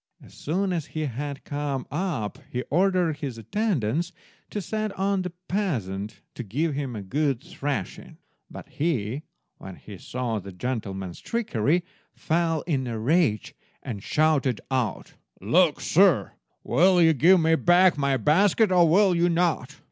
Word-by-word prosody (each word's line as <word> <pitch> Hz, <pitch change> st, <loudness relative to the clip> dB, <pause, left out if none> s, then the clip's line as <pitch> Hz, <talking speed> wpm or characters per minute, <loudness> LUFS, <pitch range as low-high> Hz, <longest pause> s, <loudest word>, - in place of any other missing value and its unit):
As -, -, -17 dB
soon 185 Hz, +5 st, -1 dB
as 165 Hz, -5 st, -3 dB
he -, -, 0 dB
had 140 Hz, 0 st, -4 dB
come 145 Hz, -2 st, -3 dB
up 150 Hz, -, -3 dB
he 125 Hz, +1 st, -3 dB
ordered 180 Hz, -2 st, +2 dB
his 140 Hz, -6 st, -5 dB
attendants 165 Hz, -, -1 dB, 0.4 s
to 210 Hz, -, -4 dB
set 215 Hz, +2 st, -3 dB
on 195 Hz, 0 st, +1 dB
the 180 Hz, -, -3 dB, 0.2 s
peasant 110 Hz, -, -3 dB
and 115 Hz, -5 st, -7 dB
give 150 Hz, +8 st, 0 dB
him 135 Hz, -4 st, -4 dB
a 105 Hz, -, -5 dB
good 135 Hz, +5 st, 0 dB
thrashing; 145 Hz, -, -5 dB, 0.3 s
but -, -, -10 dB
he, 135 Hz, -5 st, -2 dB, 0.4 s
when 95 Hz, -, -9 dB
he 100 Hz, -3 st, -12 dB
saw 120 Hz, -3 st, -3 dB
the 100 Hz, 0 st, -9 dB
gentleman's 95 Hz, -4 st, -4 dB
trickery, 175 Hz, -, 0 dB, 0.3 s
fell 165 Hz, -1 st, 0 dB
in 135 Hz, -6 st, -2 dB
a 115 Hz, -2 st, -3 dB
rage, 125 Hz, -, +1 dB, 0.3 s
and 110 Hz, -6 st, -5 dB
shouted 145 Hz, -4 st, +1 dB
out— 125 Hz, -7 st, -2 dB, 0.3 s
"Look -, -, +3 dB
you, -, -, -9 dB
sir, -, -, +4 dB, 0.3 s
will 180 Hz, +8 st, +4 dB
you 165 Hz, -1 st, +6 dB
give 175 Hz, +7 st, +5 dB
me 160 Hz, 0 st, +3 dB
back 175 Hz, +2 st, +4 dB
my 140 Hz, -2 st, +1 dB
basket, 190 Hz, -, +3 dB
or 175 Hz, -3 st, +5 dB
will 190 Hz, +2 st, +4 dB
you 175 Hz, +1 st, +2 dB
not? 165 Hz, -5 st, 0 dB
150 Hz, 155 wpm, -25 LUFS, 120-175 Hz, 0.4 s, you